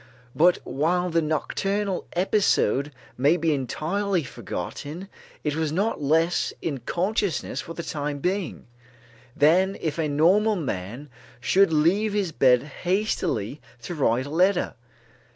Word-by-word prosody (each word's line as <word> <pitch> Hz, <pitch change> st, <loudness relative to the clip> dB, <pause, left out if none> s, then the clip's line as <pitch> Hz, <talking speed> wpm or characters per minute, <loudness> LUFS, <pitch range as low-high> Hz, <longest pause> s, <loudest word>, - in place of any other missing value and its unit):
But 175 Hz, +3 st, +5 dB
while 175 Hz, +6 st, 0 dB
the 165 Hz, 0 st, +2 dB
nocturnal 195 Hz, +6 st, -1 dB
episode 170 Hz, -, +2 dB, 0.3 s
may 145 Hz, +6 st, +4 dB
be 160 Hz, -1 st, +1 dB
entirely 170 Hz, -, -1 dB
forgotten, 155 Hz, +6 st, -6 dB, 0.4 s
it 150 Hz, -1 st, -1 dB
was 160 Hz, -2 st, -1 dB
not 200 Hz, +2 st, -1 dB
less 165 Hz, +4 st, +2 dB
in 145 Hz, -5 st, -3 dB
consciousness 185 Hz, -, -1 dB
for 165 Hz, -, -9 dB
the 170 Hz, -, -5 dB
time 145 Hz, -2 st, -3 dB
being, 185 Hz, +5 st, -2 dB, 0.7 s
than 185 Hz, +6 st, +3 dB
if 160 Hz, 0 st, -3 dB
a 160 Hz, -, +1 dB
normal 185 Hz, +9 st, +3 dB
man 125 Hz, -, -4 dB, 0.3 s
should 190 Hz, +8 st, +3 dB
leave 185 Hz, +8 st, +2 dB
his 200 Hz, -5 st, 0 dB
bed 125 Hz, -4 st, +4 dB, 0.2 s
hastily 180 Hz, -, -1 dB, 0.2 s
to 175 Hz, -, -5 dB
write 130 Hz, -5 st, +1 dB
a 145 Hz, -, -8 dB
letter. 180 Hz, +3 st, +2 dB
165 Hz, 130 wpm, -25 LUFS, 145-190 Hz, 0.7 s, But